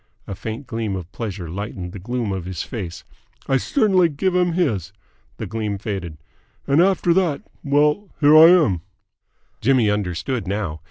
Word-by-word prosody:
A - - -6
faint 110 +7 -6
gleam 115 -5 -3
of 90 -1 -7
pleasure 100 -6 -5
lightened 90 0 -6
the 100 - -8
gloom 115 +2 -3
of 95 -3 -4
his 90 -3 -4
face. 90 -7 -6 0.4
"I 135 - +3
cert'nly 190 - +2
give 175 +5 -1
him 180 -1 +2
his!" 110 - 0 0.5
The - - -4
gleam 110 -2 -3
faded. 95 -6 -5 0.5
"And 140 +4 +3
after 180 -2 +3
that 170 -6 +1 0.2
well, 150 +7 +2
here 150 0 +6
I 160 +1 +10
am!" 150 - +4 0.8
Jimmy 120 -3 +3
understood 100 +3 -2
now. 95 -6 -3
115 Hz, 160 wpm, -21 LUFS, 95-150 Hz, 0.8 s, I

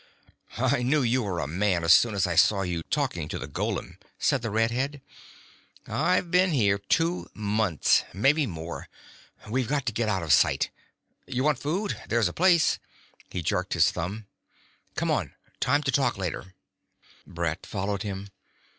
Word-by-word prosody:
"I - - +1
knew 135 +3 +2
you 125 +2 +2
were 95 -6 -3
a 80 - -1
man 90 +3 0
as 85 0 +7
soon 115 -3 +4
as 95 - +2
I 90 - -1
saw 95 +4 +4
you 90 -2 -2
talking 130 - -1
to - - -3
the 70 - -6
golem," 70 - -4 0.2
said 135 - +1
the 115 - -3
red 115 +2 +1
head. 135 +4 -2 0.9
"I've 180 -2 0
been 180 +1 +4
here 100 -7 +2
two 165 - 0
months; 105 -5 +2
maybe 140 - +2
more. 85 -3 -7 0.6
We've 125 +2 -1
got 140 0 -1
to 115 - -1
get 110 0 0
out 95 -4 0
of 80 - +3
sight. - - +3 0.6
You 130 +1 -1
want 150 -3 +2
food? 185 +10 -2
There's 115 -3 +2
a 85 - -5
place 175 -2 +3 0.2
..." - - -29
He 90 - -3
jerked - - -1
his - - +4
thumb. 100 +6 -5 0.7
"Come - - 0
on. - - -1 0.2
Time 145 +2 +2
to 140 - 0
talk 125 -4 +1
later." 95 0 -5 0.7
Brett 85 -1 -3
followed 100 0 -2
him. 100 -1 -5
110 Hz, 175 wpm, -27 LUFS, 95-135 Hz, 0.9 s, as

